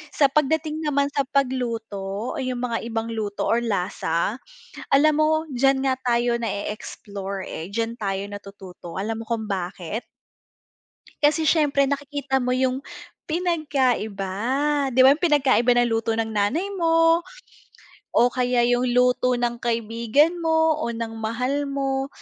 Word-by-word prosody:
sa 285 Hz, -, +5 dB
pagdating 310 Hz, +2 st, +1 dB
naman 285 Hz, -2 st, +1 dB
sa 280 Hz, -, +1 dB
pagluto 230 Hz, -6 st, -2 dB
o -, -, -5 dB
yung 255 Hz, -1 st, -3 dB
mga 235 Hz, -2 st, -2 dB
ibang 225 Hz, 0 st, -3 dB
luto 210 Hz, -2 st, -3 dB
or 230 Hz, -, +3 dB
lasa, 195 Hz, -2 st, -1 dB, 0.6 s
alam 300 Hz, +2 st, +5 dB
mo, 315 Hz, +1 st, +2 dB
diyan 270 Hz, +1 st, +2 dB
nga 260 Hz, -, +2 dB
tayo 240 Hz, -1 st, +1 dB
nae-explore, 200 Hz, -2 st, -5 dB
eh, 160 Hz, -, -6 dB
diyan 230 Hz, +1 st, -2 dB
tayo 195 Hz, -2 st, -2 dB
natututo, 195 Hz, -4 st, -10 dB
alam 220 Hz, +3 st, -3 dB
mo -, -, -8 dB
kung 225 Hz, -2 st, -2 dB
bakit? 185 Hz, +2 st, -4 dB, 1.1 s
Kasi 305 Hz, +2 st, +3 dB
siyempre, 285 Hz, -4 st, +3 dB
nakikita 280 Hz, -1 st, -2 dB
mo 250 Hz, -1 st, 0 dB
yung 260 Hz, +2 st, 0 dB, 0.4 s
pinagkaiba. 270 Hz, -, 0 dB, 0.6 s
Di 255 Hz, -, +5 dB
ba 265 Hz, -, +9 dB
yung 300 Hz, -, -9 dB
pinagkaiba 275 Hz, -7 st, +3 dB
ng 240 Hz, 0 st, +3 dB
luto 225 Hz, 0 st, 0 dB
ng 225 Hz, 0 st, -1 dB
nanay 215 Hz, -, 0 dB
mo, 330 Hz, 0 st, +4 dB, 0.9 s
o 240 Hz, -, +5 dB
kaya 250 Hz, -1 st, +1 dB
yung 245 Hz, +1 st, +2 dB
luto 250 Hz, 0 st, +3 dB
ng 240 Hz, 0 st, -1 dB
kaibigan 235 Hz, +7 st, +1 dB
mo, 320 Hz, -1 st, +2 dB
o -, -, -1 dB
ng 230 Hz, -1 st, -4 dB
mahal 250 Hz, +6 st, -1 dB
mo. 270 Hz, -1 st, -1 dB
245 Hz, 140 wpm, -23 LUFS, 225-280 Hz, 1.1 s, ba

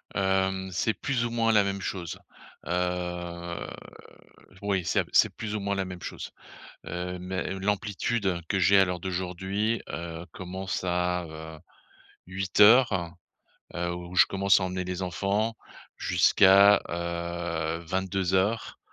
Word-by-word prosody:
Hem. 95 Hz, -1 st, 0 dB
C'est 105 Hz, +5 st, 0 dB
plus 125 Hz, -4 st, -1 dB
ou 120 Hz, -, -2 dB
moins 115 Hz, -1 st, +2 dB
la 105 Hz, -2 st, +5 dB
même 100 Hz, 0 st, -3 dB
chose. 90 Hz, -4 st, -4 dB, 0.5 s
Heu, 90 Hz, -1 st, -3 dB, 0.9 s
oui, 100 Hz, -3 st, 0 dB
c'est -, -, +1 dB
c'est -, -, +5 dB
plus 110 Hz, -1 st, -5 dB
ou -, -, -1 dB
moins 100 Hz, 0 st, -1 dB
la 95 Hz, -1 st, -1 dB
même 90 Hz, -2 st, -8 dB
chose. -, -, -7 dB, 0.6 s
Heu, 90 Hz, +1 st, -4 dB
mais 95 Hz, +1 st, -4 dB
l'amplitude 100 Hz, -1 st, -1 dB
que 95 Hz, -, +1 dB
j'ai 95 Hz, +2 st, +5 dB
à 95 Hz, -, +7 dB
l'heure 90 Hz, -1 st, -3 dB
d'aujourd'hui, 95 Hz, +5 st, -2 dB
heu, 85 Hz, +1 st, -6 dB
commence 95 Hz, +1 st, -5 dB
à, 90 Hz, 0 st, 0 dB
heu, 80 Hz, 0 st, -9 dB, 0.7 s
08:00, 95 Hz, -1 st, +4 dB, 0.6 s
heu, 85 Hz, 0 st, -2 dB
où 90 Hz, +1 st, -8 dB
je 85 Hz, -, +7 dB
commence 100 Hz, 0 st, +3 dB
à -, -, -2 dB
emmener 90 Hz, 0 st, -2 dB
les 90 Hz, +1 st, -4 dB
enfants, 100 Hz, +5 st, -1 dB, 0.4 s
jusqu'à, 100 Hz, +2 st, +6 dB
heu, 85 Hz, -1 st, -3 dB
22:00, 95 Hz, +3 st, -1 dB
95 Hz, 135 wpm, -27 LUFS, 90-100 Hz, 0.9 s, à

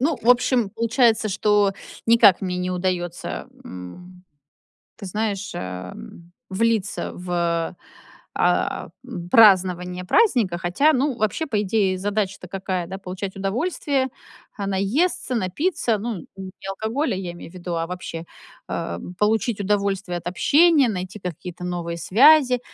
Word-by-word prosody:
Ну, 295 Hz, +3 st, +1 dB
в 230 Hz, -, -1 dB
общем, 245 Hz, -3 st, +3 dB
получается, 230 Hz, 0 st, +2 dB
что 205 Hz, 0 st, +2 dB, 0.3 s
никак 230 Hz, -5 st, +6 dB
мне 180 Hz, -2 st, -2 dB
не 180 Hz, 0 st, -2 dB
удаётся, 180 Hz, -1 st, -3 dB, 0.2 s
м, 180 Hz, -, -11 dB, 0.7 s
ты 195 Hz, -, -8 dB
знаешь, 205 Hz, 0 st, -3 dB
э, 90 Hz, 0 st, -6 dB, 0.6 s
влиться 215 Hz, 0 st, 0 dB
в, 170 Hz, -1 st, -2 dB, 0.6 s
э, -, -, +1 dB, 0.4 s
празднование 180 Hz, -4 st, +4 dB
праздника. 235 Hz, -, +3 dB
Хотя, 185 Hz, -, +3 dB
ну, 270 Hz, -1 st, 0 dB
вообще, 215 Hz, -, -1 dB
по 235 Hz, -8 st, -2 dB
идее, 195 Hz, -2 st, +1 dB
задача-то 200 Hz, -1 st, -2 dB
какая, 185 Hz, -1 st, -3 dB
да? 190 Hz, +2 st, -6 dB
Получать 190 Hz, +1 st, -6 dB
удовольствие, 265 Hz, -, -1 dB, 0.5 s
а, 200 Hz, -, -3 dB
наесться, 250 Hz, -, 0 dB
напиться, 230 Hz, -, 0 dB
ну, 210 Hz, -5 st, -5 dB
не 190 Hz, -1 st, -7 dB, 0.2 s
алкоголя, 220 Hz, +8 st, -1 dB
я 185 Hz, -2 st, -5 dB
имею 175 Hz, -, -11 dB
в -, -, -20 dB
виду, 175 Hz, -1 st, -5 dB
а 165 Hz, 0 st, -1 dB
вообще, 180 Hz, -2 st, -6 dB, 0.4 s
а, 85 Hz, -, -3 dB, 0.2 s
получить 220 Hz, +1 st, +1 dB
удовольствие 200 Hz, -3 st, -1 dB
от 170 Hz, -, -14 dB
общения, 295 Hz, -, +4 dB
найти 190 Hz, 0 st, -4 dB
какие-то 180 Hz, 0 st, -7 dB
новые 175 Hz, -1 st, -3 dB
связи. 255 Hz, -, +5 dB
195 Hz, 130 wpm, -23 LUFS, 180-230 Hz, 0.7 s, никак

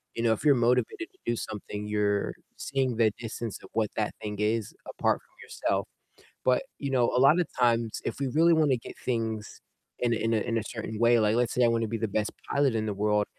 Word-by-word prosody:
you 115 Hz, -, -2 dB
know, 115 Hz, -, +4 dB
if 110 Hz, -, -5 dB
you're 145 Hz, -3 st, +6 dB
motivated 125 Hz, -, +1 dB
to 380 Hz, -, -29 dB
do 120 Hz, -, +1 dB
something, 105 Hz, -1 st, -5 dB
you're 105 Hz, -1 st, 0 dB, 0.2 s
seeing 130 Hz, -3 st, -1 dB
the 110 Hz, -3 st, +4 dB
distance 115 Hz, -2 st, -5 dB
of -, -, -12 dB
what 110 Hz, -1 st, +1 dB
that 110 Hz, -1 st, 0 dB
thing 105 Hz, -1 st, -4 dB
is 110 Hz, 0 st, 0 dB, 0.3 s
apart -, -, +2 dB
from -, -, -31 dB
yourself, -, -, -2 dB, 0.6 s
but, 125 Hz, -1 st, +3 dB, 0.2 s
you 140 Hz, -1 st, -3 dB
know, 125 Hz, -2 st, +3 dB
a -, -, +4 dB
lot 150 Hz, +6 st, +6 dB
of 170 Hz, -, +1 dB
times 115 Hz, -2 st, +2 dB
if -, -, -3 dB
we 135 Hz, -, 0 dB
really 165 Hz, +5 st, +4 dB
wanna 150 Hz, -5 st, +3 dB
get 115 Hz, -, -10 dB
things 110 Hz, -3 st, -2 dB, 0.4 s
in 120 Hz, -1 st, +1 dB
a -, -, -1 dB
in 115 Hz, +1 st, 0 dB
a -, -, +3 dB
in 115 Hz, +1 st, -1 dB
a -, -, -2 dB
certain 110 Hz, -1 st, -5 dB
way, 120 Hz, 0 st, +5 dB
like 105 Hz, +1 st, +3 dB
let's 120 Hz, -1 st, +1 dB
say 125 Hz, -, +3 dB
I -, -, +5 dB
wanna 115 Hz, -1 st, +1 dB
be 115 Hz, 0 st, -2 dB
the 110 Hz, -1 st, -1 dB
best 105 Hz, +1 st, -1 dB, 0.2 s
pilot 140 Hz, -4 st, +2 dB
in 110 Hz, -1 st, 0 dB
the 105 Hz, -, -2 dB
world, 105 Hz, +1 st, +2 dB
115 Hz, 240 wpm, -28 LUFS, 110-125 Hz, 0.6 s, you're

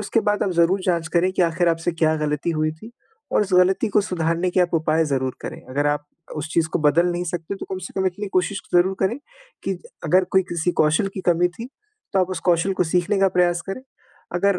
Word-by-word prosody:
उसके 210 Hz, +2 st, 0 dB
बाद 210 Hz, 0 st, +2 dB
आप 195 Hz, -, 0 dB
ज़रूर 175 Hz, +2 st, +2 dB
जाँच 170 Hz, -3 st, 0 dB
करें 180 Hz, +2 st, +3 dB
कि 185 Hz, -, +1 dB
आखिर 170 Hz, +1 st, +2 dB
आपसे 165 Hz, +1 st, 0 dB
क्या 160 Hz, -1 st, +2 dB
ग़लती 150 Hz, +1 st, -1 dB
हुई 155 Hz, -1 st, 0 dB
थी 190 Hz, +9 st, -13 dB, 0.4 s
और -, -, +4 dB
उस 195 Hz, -2 st, -5 dB
ग़लती 185 Hz, +3 st, +3 dB
को -, -, +7 dB
सुधारने 170 Hz, -1 st, -1 dB
के 185 Hz, -, +2 dB
आप 175 Hz, -1 st, +1 dB
उपाय 160 Hz, 0 st, +2 dB
ज़रूर 130 Hz, -3 st, -1 dB
करें। -, -, -6 dB
अगर 145 Hz, +3 st, 0 dB
आप 145 Hz, 0 st, -1 dB, 0.3 s
उस 155 Hz, +1 st, -4 dB
चीज़ 165 Hz, -1 st, +2 dB
को -, -, +1 dB
बदल 155 Hz, +3 st, +3 dB
नहीं 175 Hz, +1 st, -2 dB
सकते 170 Hz, +2 st, -4 dB
तो -, -, -7 dB
कम 190 Hz, -, -2 dB
से -, -, -8 dB
कम 190 Hz, -, +1 dB
इतनी 200 Hz, +3 st, -3 dB
कोशिश 185 Hz, +2 st, -2 dB
ज़रूर 180 Hz, +2 st, +4 dB
करें 210 Hz, +7 st, +1 dB, 0.5 s
कि 195 Hz, -2 st, -2 dB, 0.3 s
अगर 180 Hz, +4 st, +4 dB
कोई 190 Hz, -, +6 dB
किसी 170 Hz, +1 st, 0 dB
कौशल 155 Hz, +5 st, +2 dB
की 190 Hz, -, -4 dB
कमी 175 Hz, +1 st, +3 dB
थी 230 Hz, +2 st, -6 dB, 0.4 s
तो 195 Hz, -, +3 dB
आप 185 Hz, -, +1 dB
उस -, -, -4 dB
कौशल 175 Hz, +3 st, +2 dB
को -, -, +5 dB
सीखने 180 Hz, +3 st, +2 dB
का 195 Hz, -, +5 dB
प्रयास 175 Hz, -1 st, +3 dB
करें। 225 Hz, +7 st, -5 dB, 0.5 s
अगर 195 Hz, +1 st, +2 dB
175 Hz, 235 wpm, -22 LUFS, 160-190 Hz, 0.5 s, को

